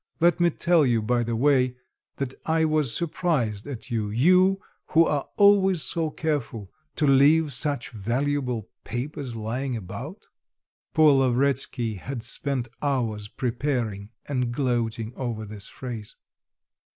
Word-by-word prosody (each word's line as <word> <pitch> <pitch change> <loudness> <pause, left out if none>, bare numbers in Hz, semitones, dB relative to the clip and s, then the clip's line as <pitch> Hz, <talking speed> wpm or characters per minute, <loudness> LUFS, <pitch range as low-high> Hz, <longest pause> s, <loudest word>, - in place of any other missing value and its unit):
Let 175 +1 +3
me 175 0 +4
tell 170 0 +3
you 120 -4 +2
by 120 +2 +1
the 115 0 -2
way, 130 0 +3 0.4
that 135 -2 -3
I 160 0 +3
was 155 -5 +1
surprised 145 - -1
at 130 -2 -8
you; 110 -3 -1
you, 185 - +4 0.3
who 165 +1 +5
are 145 -3 -1
always 195 -5 +5
so 160 +4 -1
careful, 140 - -3 0.2
to 155 - +1
leave 145 +2 +5
such 125 +1 -1
valuable 125 +1 -2 0.2
papers 130 0 -5
lying 120 +4 -3
about." 115 - -8 0.7
(Poor 155 -2 +7
Lavretsky 130 -4 +1
had 125 +2 -6
spent 135 -2 -2
hours 115 -7 -1
preparing 120 -4 -2 0.2
and 125 -4 -1
gloating 120 -3 -1
over 115 -4 -4
this 105 -1 -7
phrase.) 115 -5 -7
130 Hz, 130 wpm, -25 LUFS, 115-150 Hz, 0.7 s, Poor